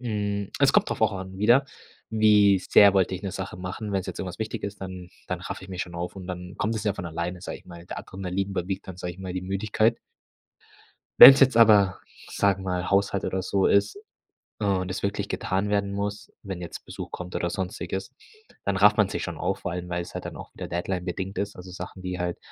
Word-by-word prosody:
hm, 105 -4 -2
es - - +5
kommt - - +3
drauf - - -3
auch - - +3
an 95 0 -7
wieder, 120 +7 +5 0.5
wie 105 -3 +5
sehr 100 +2 +6
wollte 95 -1 +2
ich 90 - -7
'ne 95 -2 -4
Sache 95 -1 -5
machen? 90 +4 -5
Wenn's 95 -2 -1
jetzt - - -6
irgendwas 90 -2 -5
wichtig 110 0 -4
ist, 100 0 -6
dann 95 -2 -7 0.2
dann - - -3
raffe - - -6
ich - - -13
mich 95 -1 -3
schon 85 - -9
auf 85 +2 -4
und 95 -2 -8
dann 90 0 -6
kommt 110 +2 -1
es 110 - -4
ja 105 - +1
von - - -6
alleine, 85 +2 -4
sage - - -6
ich - - -23
mal, 85 -1 -11
der - - -6
Adrenalin 95 +1 -4
überwiegt 95 0 -3
dann, 95 - -7
sage 90 -1 -5
ich 90 - -16
mal, 95 -1 -5
die 90 0 -3
Müdigkeit. 105 +4 +1 1.2
Wenn's 135 0 +13
jetzt 130 -3 +5
aber, 105 -4 +6 0.3
sage 100 -1 +1
mal, 90 -1 -2
Haushalt 100 0 +1
oder 95 0 -2
so 95 +1 +1
ist, 100 - +2 0.6
äh, 105 - -3
und 95 -2 0
es 95 - -4
wirklich 100 +1 -2
getan 95 +2 -1
werden 100 -1 0
muss, 100 +1 -4
wenn 95 -3 -6
jetzt 85 - -8
Besuch - - -8
kommt 90 0 -6
oder 85 - -1
Sonstiges, 95 +3 -4 0.5
dann 100 -1 0
rafft 105 +2 +6
man 105 -3 +3
sich - - -3
schon - - -5
auf, - - -2
vor - - -3
allem 90 0 -5
weil's 85 0 -4
halt - - -5
dann - - -7
auch - - -10
wieder - - -7
deadline-bedingt 90 +2 -3
ist. 100 +1 -2
Also, 90 0 -10
Sachen, 95 +1 -8
wie 90 0 -4
halt 90 -1 -2
95 Hz, 230 wpm, -26 LUFS, 90-100 Hz, 1.2 s, Wenn's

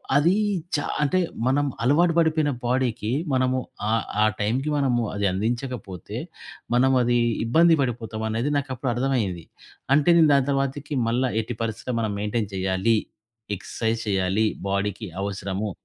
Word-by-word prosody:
అదీ 165 +7 +4 0.4
చా 145 - -1 0.2
అంటే 185 +6 +2 0.3
మనం 145 +3 +2 0.2
అలవాటు 165 +7 +4
పడిపోయిన 155 -2 +2
బాడీకి 120 -3 0 0.2
మనము 130 0 +2 0.3
ఆహ్, 115 0 +1 0.2
ఆ - - +5 0.2
టైమ్‌కి 125 +8 0
మనము 125 -4 +1
అది 100 0 -1
అందించకపోతే, 115 -2 -4 0.6
మనం 130 +2 +4
అది 120 0 +2 0.3
ఇబ్బంది 165 +8 +5
పడిపోతామనేది 115 +1 -2
నాకప్పుడర్థమయ్యేది. 125 - -1 0.5
అంటే 150 +3 +3
నేను 160 -2 +6
దాని 140 -1 +3
తర్వాతకి 140 +1 -2
మళ్ళ 120 +3 +1 0.2
ఎట్టి 115 +2 -6
పరిస్థితిలో 115 +2 -3
మనం 110 -2 -1
మెయింటైన్ 105 0 -2
చేయ్యాలి, 95 +4 +1 0.6
ఎక్సర్సైజ్ 115 +3 -2
చేయాలి 95 +2 +1 0.2
బాడీకి 100 +2 -2 0.2
అవసరము. 100 +1 -3
120 Hz, 125 wpm, -24 LUFS, 105-135 Hz, 0.6 s, నేను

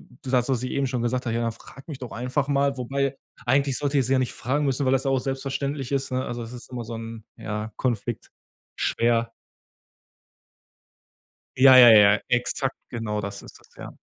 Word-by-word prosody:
d - - -19 0.2
das, 125 0 +2
was 125 -2 0
ich 125 - -3
eben 140 -1 0
schon 125 -2 -2
gesagt 125 +1 -1
habe: 115 - -1
„Ja 115 - 0
dann 115 -1 -1
frag 135 +4 -15
mich 140 -4 -6
doch 125 - -8
einfach 130 +4 -2
mal“, 140 -1 +1
wobei 135 +2 -2 0.3
eigentlich 135 +1 +2
sollte 145 -1 0
ich 130 - +1
sie 135 - 0
ja - - +3
nicht 130 - -1
fragen 145 +4 -1
müssen, 135 0 0
weil 130 - +3
das 135 +1 +1
ja 135 - +1
auch 135 - +2
selbstverständlich 135 0 -3
ist, 135 -1 -1
ne, 130 +1 -1
also 120 0 -5
das 115 +1 -7
ist 120 - -11
immer 120 -2 -5
so 115 +1 -7
'n, 115 -1 -8
ja, 105 +1 -5
Konflikt. 120 -5 -3 0.5
Schwer. 115 0 +1 2.3
Ja, 130 0 +8
ja, 120 -1 +10
ja, 105 -2 +7
exakt 125 +2 0
genau 110 -3 -3
das 100 0 -6
ist - - -14
das, - - -24
ja. - - -9
125 Hz, 210 wpm, -24 LUFS, 115-135 Hz, 2.3 s, ja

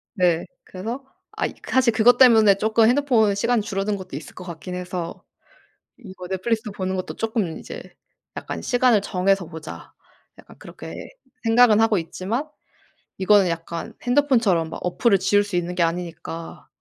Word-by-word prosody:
네. 175 -4 +2 0.2
그래서 225 +8 -6 0.3
아이 - - -3
그 - - -12
사실 260 -2 +4
그것 235 +3 +5
때문에 220 -6 +6
쪼끔 220 +1 +3
핸드폰 245 -6 +3
시간이 230 +3 +1
줄어든 200 +1 -2
것도 185 -7 -9
있을 150 - -9
것 185 - -9
같긴 180 +1 -7
해서 180 -2 -6 0.7
이거 190 -6 -10
넷플릭스도 215 +4 -2
보는 190 -1 -3
것도 185 - -5
조금 220 -8 -2
이제 - - -9 0.5
약간 - - -5
'시간을 245 -4 +3
정해서 195 -1 0
보자.' 160 -2 -10 0.5
약간 - - -16
그렇게 - - -10 0.5
생각은 225 -1 +5
하고 225 -3 +3
있지만 195 - -3 0.7
이거는 195 -1 +4
약간 165 0 -5
핸드폰처럼 240 - +2
막 - - -7
어플을 195 +3 +2
지울 205 +2 +3
수 205 -3 -6
있는 175 0 -2
게 175 - +2
아니니까 165 -1 -5
195 Hz, 345 characters per minute, -22 LUFS, 180-225 Hz, 0.7 s, 때문에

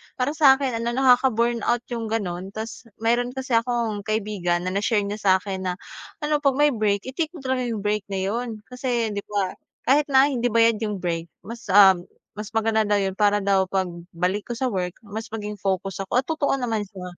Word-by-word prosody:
para 255 +3 0
sa'kin 275 -4 +4
ano, 235 +1 -2
nakaka-burnout 240 -2 +3
'yung 230 -2 -3
gano'n. 190 -4 -3
Tas 225 +2 -7 0.2
meron 245 +2 +1
kasi 265 0 -5
akong 230 -2 +1
kaibigan 195 -5 -1
na 185 - -2
na-share 205 +2 +1
niya 205 +1 -4
sa'kin 190 -1 +1
na, 180 - -1 0.5
ano, 300 0 +1
'pag 275 -2 +2
may 295 +1 +4
break, 210 -3 0
i-take 315 +4 -1
mo 280 - -10
talaga 260 -1 -1
'yung 220 -4 -3
break 210 -1 -1
na 190 -1 -2
'yon. 225 +1 -3
Kasi, 245 -3 -1
'di 205 - -3
ba, 200 -3 -1 0.3
kahit 285 +3 +3
na 275 +1 +5
hindi 245 -1 0
bayad 230 -1 +3
'yung 210 -2 -2
break, 165 -1 -2 0.2
mas, 230 +1 -9
ah, 195 0 +8 0.5
mas 210 - -4
maganda 220 -1 +2
daw 205 - +3
'yun 195 0 -1
para 205 -1 +3
daw 195 -1 +2
'pag 190 -1 -1 0.3
balik 185 +4 -1
ko 240 - -4
sa 255 0 -1
work, 180 -2 -2
mas 220 +2 -6
maging 210 -2 -6
focus 195 0 -2
ako. 250 +6 +1
At - - -48
totoo 315 -4 +1
naman 225 -6 -2
siya, 190 -2 -10
220 Hz, 200 wpm, -24 LUFS, 200-245 Hz, 0.5 s, ah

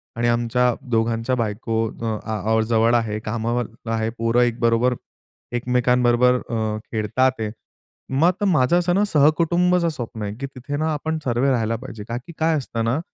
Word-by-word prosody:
आणि 120 +1 0
आमच्या 120 +1 +2 0.2
दोघांच्या 115 +2 +1
बायको 115 0 -1
अ, 110 -1 -4
आ, 110 +1 +1
जवळ 115 +1 +3
आहेत, 110 -2 -1
कामावर 115 +2 -1 0.3
आहेत, 110 0 -1
पोरं 115 +1 +2
एक 120 -1 +1
बरोबर 115 +1 +3 0.6
एकमेकांबरोबर 125 0 +3
अ, 110 -2 -1
खेळत 110 +1 -3
आहेत. 130 -5 +2 0.6
मग 175 +9 +2
माझं 160 -2 +3
असं 175 0 +1
ना, 200 - +3
सहकुटुंबचं 170 +3 +3
स्वप्न 120 -7 -6
आहे, 100 0 -3
की 140 - -3
तिथे 135 +1 -6
ना 155 +1 0
आपण 160 +2 -2
सर्व 120 +1 +1
राहायला 115 -3 0
पाहिजे. 115 -3 -8
कारण 120 0 -3
की 170 - -9
काय 160 0 +2
असतं 120 -4 -3
ना, 120 +6 +1
120 Hz, 165 wpm, -22 LUFS, 115-135 Hz, 0.6 s, जवळ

